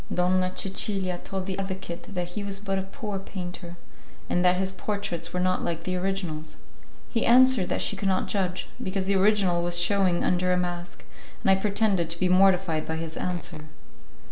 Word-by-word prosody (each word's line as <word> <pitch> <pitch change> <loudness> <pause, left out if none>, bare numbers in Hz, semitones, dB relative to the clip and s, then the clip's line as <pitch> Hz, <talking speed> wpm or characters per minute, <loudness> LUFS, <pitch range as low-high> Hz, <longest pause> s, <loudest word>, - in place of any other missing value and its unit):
Donna 185 +1 +2
Cecilia 190 -2 +1
told 190 -1 -4
the 190 0 -3
advocate 190 0 -6
that 175 -1 -2
he 205 +4 -5
was 200 -1 -1
but 195 -2 -1
a - - -1
poor 195 +1 -5
painter, 180 -2 -7 0.5
and 175 - +2
that 180 0 +5
his 190 0 0
portraits 190 -4 -4
were 180 - -2
not 185 0 +1
like 165 -1 -2
the 185 +1 -2
originals; 180 -4 -3 0.5
he 230 - -1
answered 250 -5 +6
that - - 0
she - - -2
could 195 0 -2
not 190 -1 +1
judge, 185 -3 -1
because 190 0 -2
the 200 +1 +1
original 190 -3 +3
was 175 0 +1
shewing 185 -1 +2
under 180 0 +1
a 180 - +3
mask, 175 -1 -4 0.4
and 195 - +4
I - - +6
pretended 200 -5 +1
to 170 0 -3
be 185 - +2
mortified 185 -4 +3
by 160 - -2
his 160 0 -5
answer. 170 -3 -4
185 Hz, 190 wpm, -26 LUFS, 175-195 Hz, 0.5 s, answered